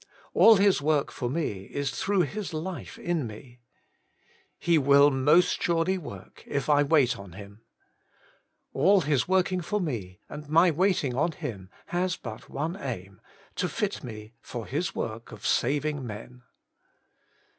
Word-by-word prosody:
2. - - -3
All 225 - +9
His 200 -5 +3
work 150 -1 +1
for 120 -3 -3
me 120 - -3
is 140 +3 -3
through 195 +9 +1
His 180 +2 -3
life 170 +3 -5
in 170 -7 -2
me. 120 +3 -12 1.0
3. 170 - -1
He - - +6
will 140 +1 +6
most 145 +6 +3
surely 170 +2 +1
work, 100 - -11
if 140 -2 -2
I 145 0 +5
wait 145 -6 +3
on 100 -3 -11
Him. 100 +3 -12 1.1
4. - - -4
All 195 +4 +6
His 145 -4 +1
working 185 0 +2
for 210 +5 -2
me, 110 - -4
and 150 0 -9
my 165 +3 +5
waiting 170 -5 +1
on 150 +6 0
Him, 105 - -7 0.2
has 180 0 -1
but 110 -2 -9
one 160 +5 -3
aim, 105 - -6 0.3
to 180 - -1
fit 205 -6 -2
me 110 -2 -9
for 120 -3 -6
His 155 - -3
work 115 +1 -5
of - - -10
saving 145 +2 0
men. 120 +3 -9
145 Hz, 160 wpm, -27 LUFS, 120-175 Hz, 1.1 s, All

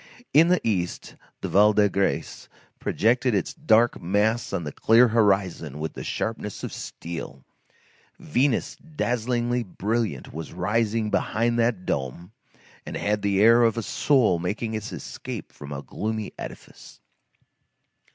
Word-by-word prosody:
In 160 +3 +7
the 180 +1 +3
East, 90 -5 -2 0.3
the - - -2
Val 105 +2 +5
de 105 0 +4
Grâce 100 0 -2 0.3
projected 120 +1 +1
its 95 - -1
dark 120 -7 +3
mass 105 +6 +1
on 85 - -2
the 75 - -5
clear 115 - +5
horizon 95 - +1
with 80 +1 -4
the - - -7
sharpness 110 -2 -4
of - - -5
steel; 80 -5 -7 0.7
Venus 125 - 0
dazzlingly 125 -5 -1
brilliant 105 - -3
was 80 +2 -7
rising 105 +4 0
behind 115 +2 +1
that 115 -6 +1
dome 70 +7 -3 0.5
and - - -5
had 105 0 0
the 100 -1 +1
air 115 +2 +7
of 115 -1 +3
a 115 - -1
soul 120 - +2
making 110 +6 -3
its 110 -1 -4
escape - - -7
from 70 0 -11
a 70 -1 -5
gloomy 110 +9 -4
edifice. - - -10
105 Hz, 140 wpm, -25 LUFS, 90-115 Hz, 0.7 s, In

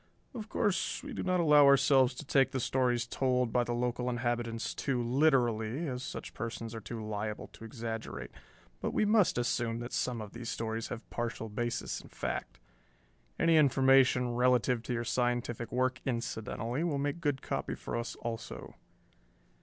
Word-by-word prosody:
"Of 220 -3 -7
course 190 -3 0
we - - -6
do - - -3
not 185 -1 +1
allow 150 -4 +7
ourselves 135 -2 +5
to 150 - -7
take 135 -1 +3
the 130 - 0
stories 125 -1 +1
told 125 -1 0
by 125 - +3
the 120 0 -2
local 125 +1 -1
inhabitants 120 -1 -2
too 130 -3 -1
literally, 125 0 +2
as 125 -2 -3
such - - -6
persons 115 0 -5
are 115 - -6
too 110 +1 -6
liable 105 0 -3
to - - -14
exaggerate, 115 -1 -5 0.5
but - - -3
we - - +3
must 210 - +4
assume 120 -1 0
that 120 - -6
some 125 -2 -1
of 105 -2 -7
these 120 -1 -6
stories 115 0 -3
have 120 - -7
partial 115 -1 -3
basis 120 +3 -3
in - - -15
fact. - - -4 0.8
Any 165 -1 +4
information 130 -3 +4
relative 125 -1 +3
to 125 - -4
your 120 0 -1
scientific 120 -1 -1
work, 130 +1 0
incidentally, 115 +2 -2
will 160 -5 0
make 145 +4 -2
good 145 -4 -1
copy - - -2
for - - -5
us 115 0 -3
also." 115 -1 -5
120 Hz, 170 wpm, -31 LUFS, 115-135 Hz, 0.8 s, allow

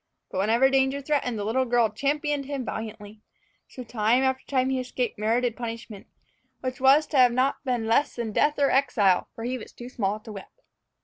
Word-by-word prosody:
But 185 - -3
whenever 230 +6 +3
danger 270 +1 +2
threatened, 275 -5 -1
the 205 - -3
little 230 +5 +1
girl 235 -2 +2
championed 285 +4 -1
him 280 -3 -4
valiantly. 215 -1 -7 0.5
So 255 - -9
time 230 +2 +1
after 265 0 0
time 260 -1 +1
he 260 - 0
escaped 250 -3 -3
merited 230 +2 0
punishment, 230 -4 -7 0.5
which 255 0 -5
was 275 +3 +5
to 295 - -2
have 250 -1 +7
been 240 - -5
not 260 +2 +1
less 245 0 +1
than 235 -2 -3
death 295 +7 +2
or 280 -1 +2
exile; 215 -9 +2
for 225 - -7
he 250 +2 -3
was - - -11
too 240 +1 -10
small 210 -4 -2
to 220 - -10
whip. 195 -2 -9
245 Hz, 195 wpm, -26 LUFS, 220-265 Hz, 0.5 s, have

